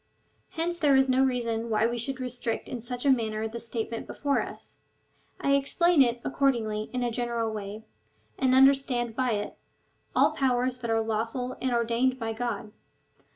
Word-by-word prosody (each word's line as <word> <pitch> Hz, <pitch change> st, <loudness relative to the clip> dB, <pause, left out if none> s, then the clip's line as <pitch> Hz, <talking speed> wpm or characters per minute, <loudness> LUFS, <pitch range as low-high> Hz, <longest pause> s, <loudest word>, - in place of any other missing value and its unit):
Hence 345 Hz, +1 st, -2 dB
there 290 Hz, -4 st, +4 dB
is 265 Hz, 0 st, +4 dB
no 260 Hz, +1 st, +3 dB
reason 235 Hz, -3 st, -1 dB
why 215 Hz, 0 st, +2 dB
we 235 Hz, +1 st, -1 dB
should 260 Hz, +3 st, -2 dB
restrict 245 Hz, -2 st, -3 dB
in 245 Hz, -, -5 dB
such 245 Hz, +3 st, -5 dB
a 275 Hz, -, +6 dB
manner 220 Hz, -3 st, 0 dB
the 230 Hz, +2 st, -6 dB
statement 230 Hz, 0 st, -4 dB
before 285 Hz, -1 st, 0 dB
us. -, -, -8 dB, 0.6 s
I 280 Hz, -, +1 dB
explain 290 Hz, +4 st, +3 dB
it, 240 Hz, -2 st, +3 dB
accordingly, 225 Hz, -6 st, 0 dB
in 250 Hz, -1 st, -2 dB
a 240 Hz, -, 0 dB
general 235 Hz, -1 st, -1 dB
way, 210 Hz, 0 st, -6 dB, 0.5 s
and 260 Hz, -1 st, +2 dB
understand 265 Hz, -3 st, +4 dB
by 255 Hz, -2 st, +1 dB
it 205 Hz, 0 st, -4 dB, 0.3 s
— -, -, -39 dB
all -, -, +5 dB
powers 255 Hz, -1 st, 0 dB
that 235 Hz, -2 st, -4 dB
are 225 Hz, 0 st, +2 dB
lawful 225 Hz, +3 st, -2 dB
and 260 Hz, -, 0 dB
ordained 235 Hz, +2 st, +1 dB
by 225 Hz, -2 st, -3 dB
God. 220 Hz, -3 st, -4 dB
240 Hz, 175 wpm, -28 LUFS, 225-260 Hz, 0.6 s, a